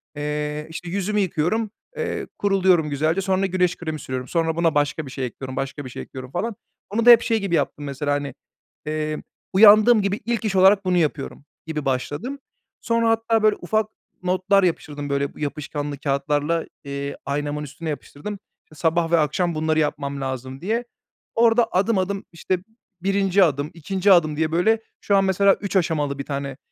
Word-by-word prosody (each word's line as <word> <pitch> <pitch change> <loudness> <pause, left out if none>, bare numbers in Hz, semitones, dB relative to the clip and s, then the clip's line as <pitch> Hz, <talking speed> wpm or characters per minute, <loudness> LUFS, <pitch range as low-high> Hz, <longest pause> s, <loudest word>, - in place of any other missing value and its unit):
Eee, 150 +1 -3
işte, 165 +2 -7
yüzümü 200 +3 -1
yıkıyorum, 200 +4 0 0.3
eee, - - -3
kuruluyorum 185 -5 +3
güzelce, 155 +6 0
sonra 190 0 +1
güneş 180 -1 +1
kremi 155 -3 -4
sürüyorum, 130 -1 -5
sonra 165 0 0
buna 165 -2 +1
başka 145 +1 0
bir 130 - -9
şey 135 -2 -3
ekliyorum, 130 +2 -7
başka 135 +1 -4
bir - - -6
şey - - -7
ekliyorum 130 0 -9
falan. 220 +4 -2 0.3
Onu 225 +4 0
da - - +8
hep 235 -1 +10
şey 225 -2 +1
gibi 195 -4 0
yaptım 145 - -1
mesela, 145 +1 -2
hani, 145 -2 -2 0.5
eee, 155 0 -3 0.3
uyandığım 215 +3 +7
gibi 200 +1 -1
ilk 235 -1 -1
iş 195 -2 0
olarak 195 +1 +5
bunu 180 -1 +2
yapıyorum 150 -3 -2 0.2
gibi 150 -2 -3
başladım. 145 - -2 0.4
Sonra 230 -1 +1
hatta, 225 -1 +2
böyle, 215 -1 +5
ufak 215 +4 0 0.4
notlar 185 +2 +2
yapıştırdım, 145 -4 -2
böyle, 140 0 0
yapışkanlı 145 -1 -4
kâğıtlarla, 145 +3 0 0.2
eee, 140 0 -5
aynamın 145 +1 -2
üstüne 155 +3 -6
yapıştırdım, 150 +5 -6 0.4
iii, - - -15
sabah 165 +1 +1
ve 170 - +5
akşam 165 +3 0
bunları 155 0 +1
yapmam 140 -2 -2
lazım 130 0 -5
diye. 225 +6 -1 0.5
Orada 230 0 +4
adım 195 +4 +2
adım, 195 +1 -2
işte, 175 +2 -1 0.4
1'inci 195 0 +3
adım, 145 -2 0
2'nci 190 +4 +1
adım 155 -5 +4
diye, 160 0 0
böyle, 220 +7 +2 0.2
şu 200 - +2
an 195 - +4
mesela 195 +1 +4
3 200 -1 -6
aşamalı 150 -6 +1
bir 140 - -4
tane, 140 -2 -4
165 Hz, 175 wpm, -23 LUFS, 145-195 Hz, 0.5 s, hep